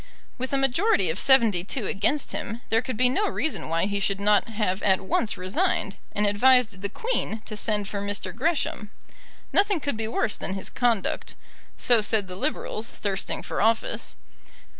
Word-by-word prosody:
With 260 Hz, +1 st, -3 dB
a 275 Hz, -, +1 dB
majority 270 Hz, -, +2 dB
of 175 Hz, -, -4 dB
seventy 230 Hz, -10 st, +5 dB
two 220 Hz, +3 st, -3 dB
against 215 Hz, +10 st, 0 dB
him, 225 Hz, +3 st, -5 dB
there 225 Hz, 0 st, +2 dB
could 255 Hz, -3 st, -5 dB
be 250 Hz, +2 st, +5 dB
no 400 Hz, +12 st, +1 dB
reason 315 Hz, -, -2 dB
why 165 Hz, +2 st, +1 dB
he 200 Hz, 0 st, -2 dB
should 200 Hz, 0 st, -1 dB
not 205 Hz, +2 st, +3 dB
have 210 Hz, -3 st, -1 dB
at 190 Hz, -1 st, +3 dB
once 200 Hz, +3 st, -1 dB
resigned, 190 Hz, -, -1 dB, 0.2 s
and 210 Hz, -, +2 dB
advised 220 Hz, -1 st, +4 dB
the 200 Hz, -, -2 dB
Queen 225 Hz, -, -2 dB
to 215 Hz, -, -6 dB
send 210 Hz, -1 st, +1 dB
for 200 Hz, -1 st, -4 dB
Mr. 200 Hz, 0 st, -4 dB
Gresham. 270 Hz, -6 st, -1 dB, 0.6 s
Nothing 405 Hz, -3 st, +3 dB
could 285 Hz, -5 st, -3 dB
be 220 Hz, 0 st, -3 dB
worse 225 Hz, -1 st, -1 dB
than 190 Hz, -, -3 dB
his 195 Hz, -, -3 dB
conduct. 235 Hz, -5 st, -1 dB, 0.4 s
So 240 Hz, -3 st, +5 dB
said 210 Hz, -1 st, +1 dB
the 180 Hz, -, -6 dB
Liberals, 230 Hz, -2 st, -2 dB
thirsting 195 Hz, -2 st, -4 dB
for -, -, -3 dB
office. 225 Hz, +2 st, 0 dB
220 Hz, 180 wpm, -25 LUFS, 200-255 Hz, 0.6 s, seventy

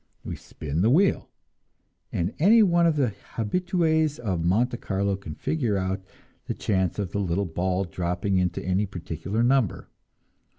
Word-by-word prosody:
We -, -, -4 dB
spin 75 Hz, +2 st, -4 dB
the 110 Hz, -, +4 dB
wheel, 180 Hz, +9 st, +3 dB, 0.8 s
and 85 Hz, +5 st, -1 dB
any 215 Hz, +7 st, +6 dB
one 170 Hz, -3 st, +4 dB
of 165 Hz, -, +2 dB
the 135 Hz, -5 st, +2 dB, 0.3 s
habitues 160 Hz, -, +1 dB
of 95 Hz, -8 st, -2 dB
Monte 120 Hz, +8 st, +2 dB
Carlo 100 Hz, -1 st, -1 dB
can 90 Hz, -6 st, -8 dB
figure 120 Hz, -10 st, -1 dB
out 95 Hz, 0 st, -2 dB, 0.4 s
the -, -, -3 dB
chance 95 Hz, -4 st, 0 dB
of 100 Hz, -4 st, -3 dB
the 100 Hz, -, -2 dB
little 95 Hz, 0 st, 0 dB
ball 90 Hz, +2 st, -1 dB
dropping 90 Hz, +1 st, -1 dB
into 90 Hz, -1 st, -1 dB
any 95 Hz, +3 st, +1 dB
particular 90 Hz, +4 st, -3 dB
number. 125 Hz, -5 st, +1 dB
100 Hz, 155 wpm, -26 LUFS, 90-135 Hz, 0.8 s, any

